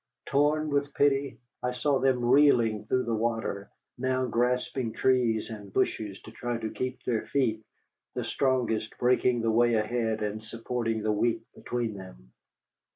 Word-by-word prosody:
Torn 150 +2 +2
with 145 0 0
pity, 140 -1 +2 0.2
I 125 0 -1
saw 135 +2 +1
them 130 -2 +2
reeling 120 -5 +4
through 130 +3 +1
the 115 - -2
water, 110 -3 -2 0.3
now 130 0 +1
grasping 125 0 0
trees 120 -4 +1
and 105 -3 -8
bushes 100 0 -1
to 110 - -11
try 120 +1 -3
to 110 -1 -4
keep 130 -1 -4
their 115 -3 -1
feet, 115 -6 0 0.5
the - - -2
strongest 125 -5 0
breaking 125 -1 +2
the 115 - +2
way 120 +1 +4
ahead 110 0 0
and 105 +1 -3
supporting 115 0 -3
the 110 - +1
weak 115 +2 +1
between 120 -3 -3
them. 60 -12 -12
120 Hz, 155 wpm, -28 LUFS, 110-130 Hz, 0.5 s, reeling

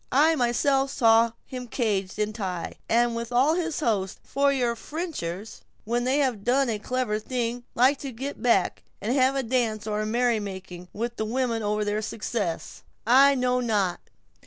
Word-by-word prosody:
"I 310 +4 +5
myself 270 +2 +2
saw 230 -3 +4
him 250 -1 -7
caged 205 -6 -1
in 210 0 -1
Ty, 185 -5 -4
with 235 0 +1
all 260 +6 +4
his 335 -2 -2
host; 200 -8 0
for 280 0 +1
your 245 -4 0
Frenchers, 225 - -5 0.2
when 240 +2 -1
they 260 +2 +2
have 255 -8 0
done 255 +2 +2
a 215 -2 -1
clever 245 -1 -1
thing, 240 +1 -3
like 260 +4 +4
to 275 - -5
get 270 +5 -6
back, 215 -7 +2 0.2
and 225 +4 -1
have 265 0 +3
a 270 - 0
dance, 225 -3 0
or 215 -1 -1
a 215 - -2
merry 235 0 +2
making, 190 -3 -7
with 235 +3 -4
the 220 - -1
women 235 0 -1
over 210 0 0
their 210 +1 -1
success." 210 -5 -4 0.2
"I 275 +4 +6
know 250 -1 +1
not. 210 -7 0
235 Hz, 175 wpm, -26 LUFS, 215-260 Hz, 0.2 s, I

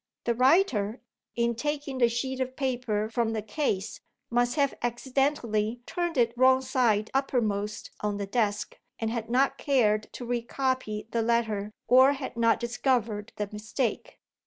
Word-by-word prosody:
The 235 - +1
writer, 255 - +3 0.4
in 235 0 +1
taking 285 +1 -3
the 240 -2 +5
sheet 260 +3 -2
of 260 0 -2
paper 245 -6 -1
from 225 0 -1
the 215 -2 -2
case, 215 -3 -2 0.3
must 245 0 +2
have 280 -3 +2
accidentally 240 -2 0
turned 345 -3 -2
it 235 -1 +3
wrong 260 +1 +5
side 235 -5 +1
uppermost 215 -6 -1
on 210 -1 -2
the 200 - -3
desk, 210 0 -1 0.2
and 225 -1 -2
had 230 -1 -4
not 260 +3 +2
cared 215 -7 +2
to 245 - -7
re 240 0 -1
copy 245 -4 -2
the 230 - +1
letter, 220 -3 0 0.2
or 260 +3 +7
had 270 -3 -6
not 230 -1 +3
discovered 235 -3 -1
the 210 - -2
mistake. 215 +3 -3
235 Hz, 155 wpm, -28 LUFS, 215-260 Hz, 0.4 s, or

